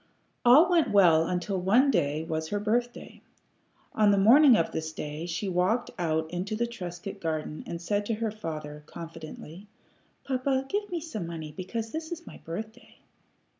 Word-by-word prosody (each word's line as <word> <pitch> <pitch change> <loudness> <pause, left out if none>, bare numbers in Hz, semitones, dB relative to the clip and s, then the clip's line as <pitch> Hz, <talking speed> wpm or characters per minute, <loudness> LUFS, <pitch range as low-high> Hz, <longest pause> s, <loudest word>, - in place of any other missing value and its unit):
All 270 +8 +7
went 345 -3 +3
well 170 -5 +5
until 180 +1 -2
one 245 +10 +4
day 150 - 0
was 160 -1 -3
her 205 +5 -2
birthday. 240 +3 -2 0.7
On 215 -1 +4
the 200 - +4
morning 245 +5 +7
of 165 - 0
this 160 0 -4
day 150 +1 -6
she 175 +4 -3
walked 185 +6 +1
out 160 -2 0
into 185 +4 -3
the 235 +2 0
Trescott 195 -3 -7
garden 155 -2 -3
and 170 - -5
said 205 +4 -1
to 225 - 0
her 220 0 -2
father, 155 -7 -6
confidently, 165 +2 -9 0.6
"Papa, 265 0 0
give 410 +5 -2
me 345 -3 -3
some 220 - -5
money, 160 -3 -7
because 220 +4 -4
this 320 +1 -5
is 340 0 -6
my - - -11
birthday." 220 +8 -8
195 Hz, 170 wpm, -28 LUFS, 165-235 Hz, 0.7 s, All